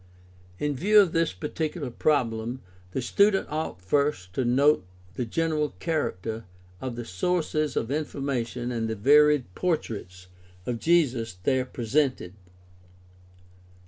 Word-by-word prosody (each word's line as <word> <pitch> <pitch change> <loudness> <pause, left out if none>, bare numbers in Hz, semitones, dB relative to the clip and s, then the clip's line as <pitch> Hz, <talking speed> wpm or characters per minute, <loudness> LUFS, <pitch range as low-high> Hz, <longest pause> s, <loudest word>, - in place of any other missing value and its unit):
— 90 0 -26
In 145 -1 0
view 210 +9 +5
of 195 -5 +5
this 165 -1 +1
peculiar 150 - -4
problem 120 -4 0 0.3
the 125 +7 -3
student 200 +9 +3
ought 150 - -3
first 140 -5 0
to 130 - 0
note 135 0 +4 0.3
the 120 +4 -3
general 155 +2 0
character 115 - -2 0.4
of 130 -2 -4
the 120 -1 -5
sources 155 - -1
of 115 - -1
information 130 -5 -2
and 115 -2 -2
the 110 - -2
varied 145 0 +4
portraits 105 - -3 0.4
of 120 -2 -2
Jesus 130 - +2
there 130 +1 +2
presented. 125 -5 -1
130 Hz, 125 wpm, -26 LUFS, 115-155 Hz, 0.4 s, view